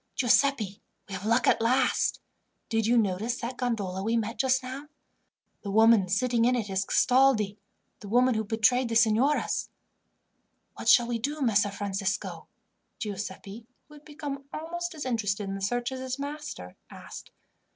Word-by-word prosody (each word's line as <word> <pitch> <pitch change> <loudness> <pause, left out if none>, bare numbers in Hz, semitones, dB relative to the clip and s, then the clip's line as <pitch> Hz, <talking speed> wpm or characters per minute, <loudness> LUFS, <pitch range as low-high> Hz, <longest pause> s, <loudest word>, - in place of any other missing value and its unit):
"Giuseppi, 245 -5 +2 0.3
we 200 - -9
have 190 +3 -5
luck 230 +2 +3
at - - +3
last. 250 +4 +1 0.5
Did 225 -2 0
you 240 +1 +3
notice 220 +3 0
that 245 +2 -4
gondola 205 -7 -2
we 225 +3 0
met 225 +1 -3
just 260 -1 +2
now? 265 +3 -7 0.7
The 200 - -6
woman 220 -2 +5
sitting 235 +4 +1
in 250 +1 +3
it 215 -5 -3
is 190 0 0
Castaldi, 245 -6 +3 0.4
the 205 - -10
woman 250 +3 +4
who 220 -1 -1
betrayed 230 +4 +2
the 230 - -2
signoras." 235 +6 +2 1.0
"What - - -2
shall 240 - +7
we 235 -1 -2
do, 290 +6 -3
Messer 210 -4 +2
Francisco?" 195 -1 -3 0.5
Giuseppi, 205 +1 -6 0.2
who - - -15
had 295 0 -15
become 290 -2 -7
almost 345 +2 -5
as 300 - -6
interested 210 -5 -1
in 195 - -4
the 195 - -6
search 240 +5 -1
as 260 - -5
his 260 0 -4
master, 285 - -7
asked. - - -11
230 Hz, 160 wpm, -27 LUFS, 205-260 Hz, 1.0 s, shall